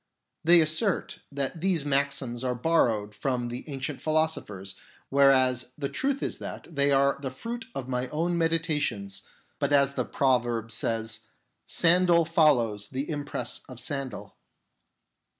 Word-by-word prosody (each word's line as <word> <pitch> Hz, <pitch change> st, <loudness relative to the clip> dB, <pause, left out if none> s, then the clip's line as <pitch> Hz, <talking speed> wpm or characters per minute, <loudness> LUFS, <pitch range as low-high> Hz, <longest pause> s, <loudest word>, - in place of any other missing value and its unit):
They 170 Hz, +1 st, +7 dB
assert 160 Hz, +5 st, 0 dB
that 140 Hz, +4 st, -3 dB
these 180 Hz, -5 st, +1 dB
maxims 140 Hz, -3 st, -1 dB
are 125 Hz, -1 st, 0 dB
borrowed 115 Hz, -7 st, +1 dB
from 125 Hz, +1 st, -2 dB
the 125 Hz, +5 st, -7 dB
ancient 135 Hz, 0 st, -4 dB
philosophers, 155 Hz, -12 st, -1 dB, 0.4 s
whereas 130 Hz, -2 st, +3 dB
the 140 Hz, -2 st, -3 dB
truth 275 Hz, 0 st, -1 dB
is -, -, -3 dB
that 165 Hz, -, -8 dB
they 140 Hz, 0 st, +3 dB
are 140 Hz, 0 st, +3 dB
the 135 Hz, -, -3 dB
fruit 230 Hz, -, -6 dB
of 130 Hz, -2 st, -4 dB
my 125 Hz, 0 st, -1 dB
own 165 Hz, +6 st, -1 dB
meditations, 155 Hz, -, -1 dB, 0.4 s
but 140 Hz, -, 0 dB
as 140 Hz, -1 st, +4 dB
the -, -, -1 dB
proverb 120 Hz, -4 st, 0 dB
says, 110 Hz, 0 st, -3 dB, 0.2 s
" -, -, -48 dB, 0.2 s
Sandal 170 Hz, 0 st, +4 dB
follows 125 Hz, -11 st, +2 dB
the 135 Hz, +2 st, -3 dB
impress 145 Hz, -5 st, -2 dB
of 125 Hz, -2 st, -9 dB
sandal." 135 Hz, +1 st, -5 dB
140 Hz, 140 wpm, -27 LUFS, 125-155 Hz, 0.4 s, They